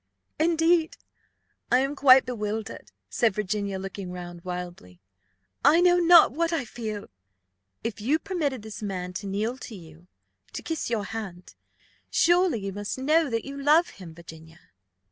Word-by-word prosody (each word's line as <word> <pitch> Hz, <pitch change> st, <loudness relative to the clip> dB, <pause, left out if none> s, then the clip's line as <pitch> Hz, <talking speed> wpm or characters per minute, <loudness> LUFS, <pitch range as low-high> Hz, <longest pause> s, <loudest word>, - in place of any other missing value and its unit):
"Indeed 330 Hz, 0 st, +2 dB, 0.7 s
I 250 Hz, -, +6 dB
am 270 Hz, +3 st, 0 dB
quite 265 Hz, -2 st, +6 dB
bewildered," 220 Hz, -3 st, -5 dB, 0.2 s
said 225 Hz, -5 st, +1 dB
Virginia, 200 Hz, -1 st, -2 dB
looking 190 Hz, -1 st, -6 dB
round 175 Hz, -1 st, -8 dB
wildly; 175 Hz, -, -7 dB, 0.6 s
"I 325 Hz, -, +6 dB
know 355 Hz, 0 st, +5 dB
not 345 Hz, -3 st, +7 dB
what 330 Hz, +5 st, -1 dB
I 320 Hz, -6 st, -1 dB
feel." 215 Hz, -3 st, -6 dB, 0.8 s
"If 225 Hz, -1 st, -4 dB
you 275 Hz, +9 st, +2 dB
permitted 305 Hz, -, -3 dB
this 220 Hz, 0 st, -8 dB
man 185 Hz, -3 st, -4 dB
to 200 Hz, +3 st, -6 dB
kneel 215 Hz, +6 st, -2 dB
to 225 Hz, -, -9 dB
you, 165 Hz, -1 st, -14 dB, 0.5 s
to -, -, -6 dB
kiss 325 Hz, -6 st, -3 dB
your 220 Hz, -4 st, -1 dB
hand, 195 Hz, -6 st, -7 dB, 0.6 s
surely 345 Hz, -, +3 dB
you 195 Hz, -, -4 dB
must 205 Hz, +4 st, -4 dB
know 305 Hz, +3 st, +2 dB
that 230 Hz, -2 st, -2 dB
you 275 Hz, 0 st, -7 dB
love 310 Hz, +5 st, +4 dB
him, 170 Hz, -4 st, -12 dB
Virginia?" 160 Hz, -1 st, -14 dB
220 Hz, 150 wpm, -26 LUFS, 190-300 Hz, 0.8 s, not